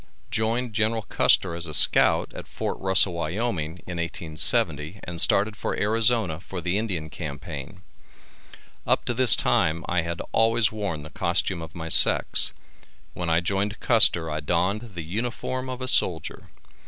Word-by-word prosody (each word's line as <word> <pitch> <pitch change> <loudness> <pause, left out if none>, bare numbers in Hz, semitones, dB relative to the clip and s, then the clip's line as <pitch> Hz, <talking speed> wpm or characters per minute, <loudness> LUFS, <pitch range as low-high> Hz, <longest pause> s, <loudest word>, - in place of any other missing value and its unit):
Joined 115 +2 -1
General 110 +1 0
Custer 95 -3 +1
as 85 0 -4
a 75 - -2
scout - - +4
at - - -9
Fort - - -5
Russell, 95 -1 +2
Wyoming, 85 -1 -4
in 90 -1 -7
1870, 80 0 0
and 85 -1 -3
started 105 +2 +1
for - - -4
Arizona 110 -5 +1
for 95 +1 -8
the 85 +2 -2
Indian 90 -8 -4
Campaign. 75 +3 -8 1.0
Up - - +1
to 120 - -1
this 125 -2 +6
time 80 0 0
I 90 - 0
had 85 +1 -5
always 115 0 +2
worn 100 -8 -5
the 75 - -12
costume 90 -3 -1
of 80 +1 -10
my 80 -1 -6
sex. - - +5 0.6
When 85 -1 -4
I 80 +1 +2
joined 100 +4 -2
Custer 100 -8 +5
I 75 - -3
donned 100 +8 -2
the 85 - -5
uniform 120 +7 -4
of 130 0 -6
a - - -4
soldier. 85 - -1
90 Hz, 155 wpm, -24 LUFS, 80-110 Hz, 1.0 s, this